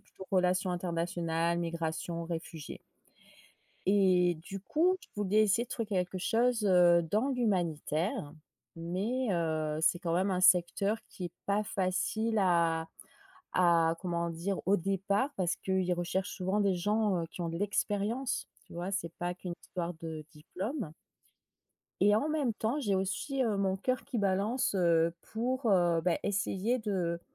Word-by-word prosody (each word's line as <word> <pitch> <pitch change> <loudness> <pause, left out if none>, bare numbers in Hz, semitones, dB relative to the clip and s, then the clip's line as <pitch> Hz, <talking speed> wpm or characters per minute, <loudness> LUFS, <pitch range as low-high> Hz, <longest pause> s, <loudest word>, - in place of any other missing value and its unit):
plutôt 190 - -13
relations 185 0 +2
internationales, 170 -1 -1
migrations, 165 0 -3
réfugiés. 165 -2 -6 1.1
Et 185 -3 +4
du 195 +2 -7
coup, 340 - +2
je - - -17
voulais 205 +1 +3
essayer 215 +3 +2
de - - -22
trouver 230 -3 -3
quelque 185 -2 -1
chose, 230 +3 +1
heu, 175 -3 +6
dans 215 - 0
l'humanitaire, 180 - -1 0.4
mais, 200 +10 -2
heu, 155 -3 0
c'est 165 +2 +3
quand 170 -1 -1
même 190 +3 +1
un 180 -1 0
secteur 185 +4 +4
qui 185 - -8
est 170 - -11
pas 200 +1 +2
facile 210 +3 0
à 165 -3 +2 0.7
à 170 -2 +4
comment 170 -2 -1
dire? 180 +4 -3
Au 200 +2 +4
départ, 195 - 0
parce 175 -2 0
qu'ils 190 -1 0
recherchent 175 +2 -2
souvent 190 +3 0
des 200 -2 +3
gens, 205 +2 +1
heu, - - -4
qui - - -9
ont 170 - -2
de 165 - -4
l'expérience, 205 +6 -1 0.2
tu - - -16
vois? 175 +3 -3
C'est 175 -4 -2
pas 175 0 -2
qu'une 180 -1 -6
histoire 175 -1 -4
de 160 -1 -7
diplôme. 190 - -5 1.1
Et 205 +1 +5
en 290 - 0
même 295 -6 0
temps, 230 +8 -1
j'ai 205 -6 0
aussi 200 +9 -1
heu, 215 -3 0
mon 190 -1 +1
coeur 255 +5 -1
qui 260 -4 -3
balance, 200 +5 +1
heu, 170 -2 +3 0.2
pour, 245 +1 0
heu, 175 -3 +3
bah 170 +1 +1
essayer 205 +4 0
de 180 -6 -1
185 Hz, 155 wpm, -31 LUFS, 170-210 Hz, 1.1 s, heu